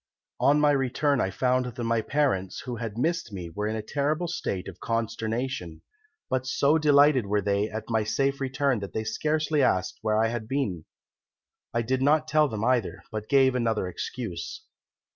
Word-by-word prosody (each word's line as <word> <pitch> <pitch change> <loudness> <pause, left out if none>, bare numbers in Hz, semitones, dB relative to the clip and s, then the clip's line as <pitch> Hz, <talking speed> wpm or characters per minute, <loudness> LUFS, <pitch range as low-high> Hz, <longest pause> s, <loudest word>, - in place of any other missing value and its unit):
On 145 +1 +4
my 150 0 +4
return 140 0 +1
I 95 - 0
found 125 +5 +1
that 120 - -4
my 115 -1 +1
parents, 120 -9 0
who 125 -3 -5
had 115 -2 -5
missed 165 -2 -1
me, 90 -4 -6
were 105 +5 -3
in 110 - -2
a 110 - -4
terrible 150 +8 -1
state 100 - -3
of 90 -2 -9
consternation, 115 -4 -3 0.4
but 130 0 -1
so 140 +4 +3
delighted 145 -5 +5
were 105 +1 +1
they 100 +1 0
at 110 0 -5
my 110 -2 +1
safe 135 +6 0
return 135 -2 0
that 100 -1 -7
they 110 - -2
scarcely 155 +6 0
asked 95 -8 +1
where 110 -1 +1
I 110 +1 +3
had 115 -2 -4
been. 110 - -2 0.9
I 115 0 0
did 130 +3 0
not 155 +3 +3
tell 155 -1 +4
them 110 -5 -4
either, 125 -5 0
but 110 0 -5
gave 135 -2 +5
another 115 -6 0
excuse. 90 -1 -5
120 Hz, 180 wpm, -27 LUFS, 105-140 Hz, 0.9 s, delighted